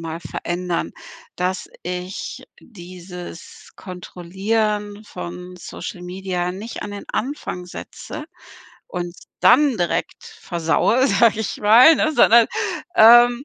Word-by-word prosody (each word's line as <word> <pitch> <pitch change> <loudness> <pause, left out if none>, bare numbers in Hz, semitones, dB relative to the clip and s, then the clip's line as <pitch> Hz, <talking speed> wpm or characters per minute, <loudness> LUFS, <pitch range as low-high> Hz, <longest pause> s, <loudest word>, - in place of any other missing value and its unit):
mal 165 0 -6
verändern, 175 +2 -3 0.4
dass 180 +1 -2
ich 180 +2 -6 0.2
dieses 180 -4 -11
Kontrollieren 205 +4 -3
von 180 -1 -8
Social 175 0 -8
Media 180 0 -3
nicht 210 +5 -7
an 205 - -7
den 200 - -8
Anfang 235 -8 -4
setze 300 - -8 0.6
und 175 0 -5 0.2
dann 265 +8 +5
direkt 175 -3 -2
versaue, 255 - 0
sag 230 -4 +4
ich 220 -2 -3
mal, 235 +10 +7
ne? 310 0 +1
Sondern, 235 -4 +6 0.5
ähm 240 +3 +7
185 Hz, 105 wpm, -21 LUFS, 180-225 Hz, 0.6 s, mal